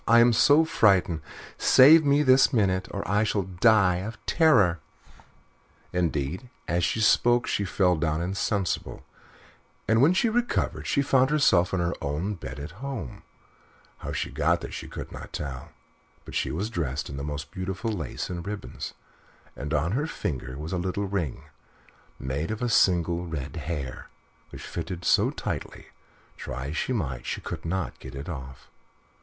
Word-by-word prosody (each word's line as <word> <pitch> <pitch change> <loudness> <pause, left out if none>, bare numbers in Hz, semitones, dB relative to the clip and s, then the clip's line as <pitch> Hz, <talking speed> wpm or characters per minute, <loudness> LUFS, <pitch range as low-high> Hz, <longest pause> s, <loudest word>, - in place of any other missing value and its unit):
I 115 +1 +7
am 120 0 +6
so 145 +7 +5
frightened. 95 - +3 0.4
Save 155 +5 +7
me 145 +1 +3
this 130 0 +5
minute, 95 -6 +1
or - - -5
I 105 +2 +2
shall 105 -2 0
die 95 0 +3
of 105 +6 -5
terror." 110 - +4 1.1
Indeed, 85 - -1 0.2
as 85 +2 0
she 85 +8 0
spoke 120 +2 +4
she 100 - -1
fell 90 -1 +2
down 80 0 0
insensible, 95 +2 -2 0.8
and 115 +1 +4
when 160 +7 +5
she 235 - +3
recovered 240 +2 -1
she 140 - +2
found 130 -1 +3
herself 95 - +3
in 95 - 0
her 85 0 0
own 75 +2 -2
little 105 - -5
bed 65 -3 -8
at 75 +3 -7
home; 110 - -6 0.8
how - - -5
she - - -3
got - - +1
there - - -7
she - - -6
could - - -8
not - - -9
tell, 70 -4 -5 0.6
but - - -10
she - - 0
was 100 +8 -3
dressed 75 - -2
in 70 - -7
the 70 - -4
most 75 0 -5
beautiful 95 +4 -3
lace 105 - -4
and 90 0 -6
ribbons, 105 0 -6 0.6
and 70 +3 -6
on 80 +3 +1
her 145 +8 0
finger 65 - -4
was 75 +4 -5
a 90 - 0
little 95 +3 -2
ring, 95 -9 -3 0.7
made 70 +5 -3
of 110 +2 -3
a 120 - +1
single 85 -4 +2
red 75 -2 -5
hair, 75 -4 -5 0.4
which - - -10
fitted 85 +1 -5
so - - +4
tightly - - -5
that, - - -27
try 65 +2 -5
as 80 - -4
she - - -1
might, 70 - -2
she - - -3
could - - -6
not 90 0 -3
get 65 +1 -10
it 70 +1 -7
off. 65 -6 -8
90 Hz, 170 wpm, -26 LUFS, 75-115 Hz, 1.1 s, I